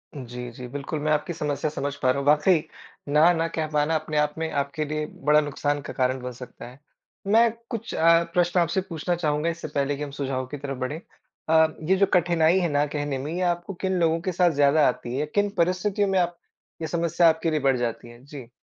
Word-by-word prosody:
जी, 125 Hz, -2 st, -7 dB
जी, 125 Hz, +1 st, -9 dB
बिल्कुल 145 Hz, +3 st, -5 dB
मैं 155 Hz, +1 st, -1 dB
आपकी 150 Hz, +4 st, 0 dB
समस्या 150 Hz, -1 st, -2 dB
समझ 145 Hz, -1 st, -3 dB
पा 130 Hz, -, +2 dB
रहा 140 Hz, -, -1 dB
हूँ 140 Hz, -, -4 dB
वाक़ई, 150 Hz, +3 st, +4 dB, 0.4 s
ना 155 Hz, +4 st, +5 dB
न 165 Hz, -1 st, 0 dB
कह 155 Hz, -1 st, -1 dB
पाना 150 Hz, +2 st, +1 dB
अपने 155 Hz, -1 st, -2 dB
आप 150 Hz, 0 st, +1 dB
में 160 Hz, 0 st, -2 dB
आपके 140 Hz, +2 st, -2 dB
लिए 155 Hz, +1 st, -3 dB, 0.2 s
बड़ा 150 Hz, 0 st, +7 dB
नुकसान 145 Hz, 0 st, -2 dB
का -, -, -8 dB
कारण 130 Hz, 0 st, 0 dB
बन 125 Hz, 0 st, -5 dB
सकता 125 Hz, 0 st, -10 dB
है। 125 Hz, +3 st, -14 dB, 0.5 s
मैं 225 Hz, +2 st, +5 dB, 0.2 s
कुछ 230 Hz, -2 st, -5 dB
अ, 165 Hz, +1 st, +5 dB
प्रश्न 175 Hz, 0 st, +2 dB
आपसे 170 Hz, +3 st, +1 dB
पूछना 170 Hz, +1 st, -2 dB
चाहूँगा 155 Hz, -1 st, 0 dB
इससे 170 Hz, 0 st, -5 dB
पहले 140 Hz, 0 st, -1 dB
कि 150 Hz, -, -4 dB
हम 145 Hz, -, -6 dB
सुझाव 135 Hz, -2 st, -3 dB
की 145 Hz, +3 st, -6 dB
तरफ 135 Hz, -1 st, -5 dB
बढ़ें। 130 Hz, +5 st, -4 dB, 0.5 s
अ, 160 Hz, 0 st, +6 dB, 0.2 s
ये 190 Hz, -, +5 dB
जो 200 Hz, -, +4 dB
कठिनाई 175 Hz, 0 st, +3 dB
है 175 Hz, -, 0 dB
ना 145 Hz, 0 st, +2 dB
कहने 145 Hz, -2 st, -2 dB
में 145 Hz, +4 st, -5 dB
ये 180 Hz, -, -2 dB
आपको 175 Hz, +2 st, -1 dB
किन 190 Hz, -1 st, 0 dB
लोगों 165 Hz, -1 st, +2 dB
के 185 Hz, +1 st, -2 dB
साथ 175 Hz, 0 st, +3 dB
ज़्यादा 145 Hz, +1 st, +4 dB
आती 125 Hz, 0 st, -3 dB
है? 150 Hz, -, 0 dB
किन 205 Hz, +7 st, 0 dB
परिस्थितियों 185 Hz, +4 st, +1 dB
में 190 Hz, -, +2 dB
आप 175 Hz, -1 st, -1 dB, 0.4 s
ये 160 Hz, -, -2 dB
समस्या 170 Hz, +1 st, +3 dB
आपके 160 Hz, 0 st, 0 dB
लिए 155 Hz, -, +1 dB
बढ़ 135 Hz, -2 st, +2 dB
जाती 120 Hz, -1 st, -3 dB
है 120 Hz, +2 st, -15 dB
जी? 140 Hz, -4 st, -10 dB
155 Hz, 230 wpm, -25 LUFS, 140-170 Hz, 0.5 s, बड़ा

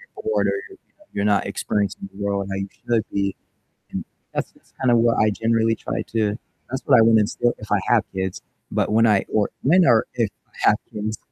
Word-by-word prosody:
bored 440 Hz, +2 st, 0 dB
or -, -, +2 dB, 0.2 s
you're 385 Hz, -, -14 dB, 0.4 s
you're 100 Hz, -, -1 dB
not 105 Hz, -1 st, +2 dB
experiencing 100 Hz, -1 st, -2 dB
the 100 Hz, +1 st, -7 dB
world 100 Hz, -1 st, -1 dB
how 95 Hz, -, -3 dB
you 95 Hz, 0 st, -3 dB
should 115 Hz, -3 st, -1 dB
be, 100 Hz, -1 st, 0 dB, 0.6 s
and -, -, -3 dB, 0.3 s
that's -, -, -2 dB
that's -, -, -27 dB
kind 130 Hz, -2 st, +3 dB
of 120 Hz, -, +5 dB
what 115 Hz, 0 st, +3 dB
I 110 Hz, 0 st, +4 dB
generally 115 Hz, +1 st, +1 dB
try -, -, -4 dB
to 105 Hz, -2 st, +1 dB, 0.3 s
that's 130 Hz, +1 st, -3 dB
what 130 Hz, -, +6 dB
I 115 Hz, -, +7 dB
wanna 110 Hz, -1 st, +6 dB
instill, 120 Hz, +3 st, +1 dB
if 105 Hz, -, -11 dB
I 105 Hz, -, +4 dB
have 120 Hz, -3 st, +4 dB
kids, 95 Hz, -1 st, -3 dB, 0.3 s
but -, -, +1 dB
when 115 Hz, +1 st, +5 dB
I 100 Hz, -2 st, +3 dB
or 105 Hz, -2 st, +2 dB
when 175 Hz, +6 st, +5 dB
or 115 Hz, -3 st, +5 dB
if 115 Hz, -4 st, 0 dB, 0.2 s
I -, -, 0 dB
have -, -, +3 dB, 0.2 s
kids, 110 Hz, +1 st, -3 dB
110 Hz, 215 wpm, -22 LUFS, 100-115 Hz, 0.6 s, I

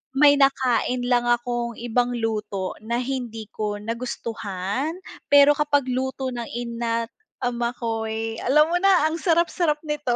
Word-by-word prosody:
may 285 Hz, 0 st, +6 dB
nakain 255 Hz, -2 st, +2 dB
lang 240 Hz, -1 st, +3 dB
akong 240 Hz, 0 st, 0 dB
ibang 240 Hz, +1 st, 0 dB
luto 210 Hz, -4 st, -3 dB
na 235 Hz, +3 st, -2 dB
hindi 240 Hz, -5 st, -4 dB
ko 210 Hz, -1 st, -3 dB
nagustuhan, 225 Hz, -, -3 dB, 0.3 s
pero 285 Hz, 0 st, +7 dB
kapag 285 Hz, -3 st, +1 dB
luto 265 Hz, +1 st, -2 dB
ng 240 Hz, -1 st, -4 dB
ina't 235 Hz, -1 st, -2 dB, 0.3 s
ama 240 Hz, 0 st, -1 dB
ko'y, 225 Hz, -1 st, -3 dB
alam 300 Hz, +5 st, +3 dB
mo 350 Hz, -, +3 dB
na 365 Hz, -5 st, +4 dB
ang 330 Hz, -, -2 dB
sarap 340 Hz, -2 st, +2 dB
sarap 325 Hz, -5 st, +1 dB
nito. 295 Hz, -5 st, -1 dB
240 Hz, 140 wpm, -24 LUFS, 225-275 Hz, 0.3 s, pero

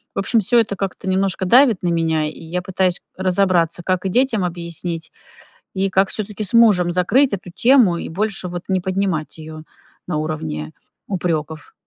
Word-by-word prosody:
В -, -, -1 dB
общем, 210 Hz, +4 st, +2 dB
всё 220 Hz, +4 st, 0 dB
это 215 Hz, -3 st, 0 dB
как-то 195 Hz, -1 st, -5 dB
немножко 190 Hz, 0 st, 0 dB
давит 235 Hz, -1 st, +4 dB
на 175 Hz, -, +1 dB
меня, 160 Hz, -2 st, +1 dB
и 150 Hz, -, -5 dB
я 175 Hz, +3 st, -3 dB
пытаюсь 185 Hz, -1 st, 0 dB, 0.2 s
разобраться, 185 Hz, -2 st, +1 dB
как 185 Hz, 0 st, -1 dB
и -, -, -1 dB
детям 235 Hz, -2 st, +1 dB
объяснить, 170 Hz, -1 st, -5 dB, 0.6 s
и 195 Hz, +1 st, 0 dB
как 190 Hz, +1 st, +2 dB
всё-таки 215 Hz, 0 st, -4 dB
с 200 Hz, -, -1 dB
мужем 205 Hz, -7 st, +5 dB
закрыть 240 Hz, +10 st, +3 dB
эту 190 Hz, -2 st, -5 dB
тему 240 Hz, -8 st, +5 dB
и -, -, -6 dB
больше 195 Hz, +2 st, -2 dB
вот 175 Hz, 0 st, -5 dB
не 190 Hz, -1 st, +1 dB
поднимать 185 Hz, -4 st, -2 dB
её 155 Hz, 0 st, -9 dB, 0.5 s
на 175 Hz, -, -1 dB
уровне 150 Hz, -, -4 dB, 0.4 s
упрёков. 160 Hz, -5 st, -3 dB
185 Hz, 170 wpm, -20 LUFS, 170-200 Hz, 0.6 s, мужем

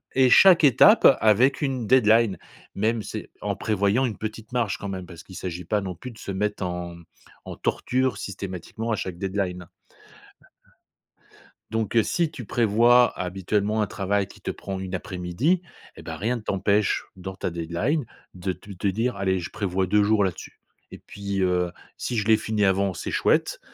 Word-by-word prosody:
et 130 Hz, -1 st, +5 dB
chaque 180 Hz, +5 st, +7 dB
étape 140 Hz, -, +7 dB
avec 115 Hz, +7 st, +4 dB
une 135 Hz, -5 st, -1 dB
deadline 115 Hz, -3 st, +4 dB, 0.4 s
Même 110 Hz, +2 st, 0 dB
c'est, -, -, -7 dB
en -, -, -2 dB
prévoyant 105 Hz, +4 st, +1 dB
une 115 Hz, -, -3 dB
petite 110 Hz, +1 st, -7 dB
marge 115 Hz, -5 st, 0 dB
quand 100 Hz, -, -5 dB
même, 95 Hz, -2 st, -5 dB
parce 85 Hz, -2 st, -12 dB
qu'il 95 Hz, -, -13 dB
s'agit 90 Hz, -1 st, -5 dB
pas 105 Hz, +3 st, 0 dB
non 95 Hz, -2 st, -4 dB
plus 125 Hz, +9 st, -9 dB
de 110 Hz, -, -16 dB
se 100 Hz, -, -6 dB
mettre 105 Hz, +1 st, -2 dB
en, 90 Hz, -1 st, -4 dB
mmh, 85 Hz, -, -14 dB, 0.4 s
en -, -, -7 dB
torture 130 Hz, -3 st, 0 dB
systématiquement 100 Hz, +3 st, -5 dB
à -, -, +2 dB
chaque 95 Hz, -4 st, -5 dB
deadline 95 Hz, -2 st, -3 dB, 2.0 s
donc, 110 Hz, 0 st, -2 dB
heu, 115 Hz, -, +6 dB
si 170 Hz, -4 st, 0 dB
tu 125 Hz, -7 st, -8 dB
prévois 120 Hz, +3 st, +4 dB
habituellement 100 Hz, +4 st, -1 dB
un 105 Hz, -, -2 dB
travail 100 Hz, +1 st, -1 dB
qui -, -, -16 dB
te -, -, -4 dB
prend 95 Hz, -1 st, -6 dB
1 95 Hz, -1 st, -4 dB
après-midi 95 Hz, -, -1 dB, 0.3 s
et -, -, -11 dB
ben, -, -, -6 dB
rien 120 Hz, +4 st, -1 dB
ne -, -, -9 dB
t'empêche, 100 Hz, 0 st, +1 dB
dans 95 Hz, 0 st, -7 dB
ta 95 Hz, -, -3 dB
deadline 85 Hz, -, -1 dB, 0.3 s
de 90 Hz, +1 st, -3 dB
te 95 Hz, +3 st, -13 dB
te 100 Hz, +1 st, -3 dB
dire: 115 Hz, +6 st, 0 dB
«Allez 95 Hz, -1 st, 0 dB
je 85 Hz, -, -7 dB
prévois 95 Hz, -3 st, -1 dB
2 105 Hz, +3 st, +3 dB
jours 105 Hz, 0 st, +3 dB
là-dessus. 95 Hz, -3 st, -5 dB, 0.3 s
Et -, -, -9 dB
puis, 100 Hz, -1 st, -5 dB
heu, 90 Hz, -1 st, +1 dB, 0.3 s
si 120 Hz, -, -3 dB
je 105 Hz, -1 st, -1 dB
l'ai 110 Hz, -1 st, +6 dB
fini 105 Hz, -1 st, 0 dB
avant 95 Hz, -1 st, +1 dB
c'est -, -, -5 dB
chouette, -, -, +1 dB
100 Hz, 185 wpm, -24 LUFS, 95-115 Hz, 2.0 s, chaque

